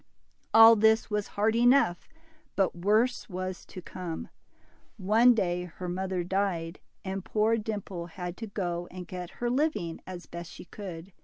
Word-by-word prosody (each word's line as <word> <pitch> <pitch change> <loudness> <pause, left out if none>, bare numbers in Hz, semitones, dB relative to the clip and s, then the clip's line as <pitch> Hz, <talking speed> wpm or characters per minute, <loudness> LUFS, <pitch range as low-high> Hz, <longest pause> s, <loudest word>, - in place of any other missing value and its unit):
All 225 +1 +9
this 220 +1 +3
was 210 -1 -1
hard 220 +2 +2
enough, 240 -7 +3 0.5
but 195 -3 +1
worse 215 +8 +1
was 185 0 -5
to 185 - -9
come. 175 -3 -6 0.7
One 225 +5 +5
day 180 -4 0
her 180 +1 -8
mother 185 0 -2
died, 180 -2 -1 0.3
and 190 0 -3
poor 220 +2 +2
Dimple 205 -5 -4
had 175 +1 -6
to 225 - -6
go 175 -4 -3
and 180 -1 -8
get 180 -1 -7
her 240 - -1
living 250 - -1
as 180 -2 -7
best 170 0 -8
she - - -11
could. 185 -2 -9
190 Hz, 155 wpm, -29 LUFS, 175-220 Hz, 0.7 s, All